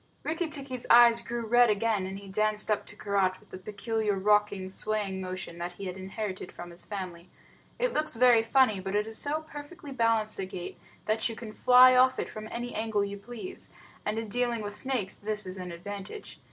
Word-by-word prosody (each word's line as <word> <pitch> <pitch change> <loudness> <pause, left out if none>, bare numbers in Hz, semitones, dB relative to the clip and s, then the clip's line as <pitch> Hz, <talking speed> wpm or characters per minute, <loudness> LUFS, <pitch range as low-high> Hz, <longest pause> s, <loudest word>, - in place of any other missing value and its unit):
Rikki 325 +2 -1
tikki's 270 -5 -4
eyes 235 -1 +7
grew 235 0 -4
red 240 +1 +5
again, 210 -2 +1
and 190 +1 -6
he 200 0 -11
danced 215 +2 +1
up 210 - 0
to - - -12
Karait 195 -2 0
with - - -24
the 185 - -8
peculiar 210 +1 -2
rocking, 205 -1 +2
swaying 195 -1 -1
motion 185 -2 -6
that 175 +1 -4
he 195 - -8
had 185 -1 -4
inherited 190 0 -5
from 175 0 -9
his 170 - -8
family. 180 -4 -7 0.5
It - - 0
looks 305 -4 0
very 240 -1 +6
funny, 225 -3 +3
but 190 +1 -4
it 210 0 +2
is 225 0 0
so 305 +2 0
perfectly 290 0 -10
balanced 230 -4 +1
a 190 - -1
gait 180 -2 -7 0.3
that 220 +2 +1
you 225 - -6
can 220 -2 -8
fly 255 +2 +7
off 255 +1 +5
from 215 0 -5
it - - -9
at - - -10
any 240 +1 -4
angle 215 -2 0
you 200 0 -6
please, 245 - -8 0.3
and 210 +1 -2
in 225 0 -3
dealing 235 +1 0
with 205 0 -5
snakes 250 -7 0
this 210 0 -3
is 185 0 -6
an 180 -1 -6
advantage. 200 - -8
215 Hz, 210 wpm, -29 LUFS, 195-240 Hz, 0.5 s, eyes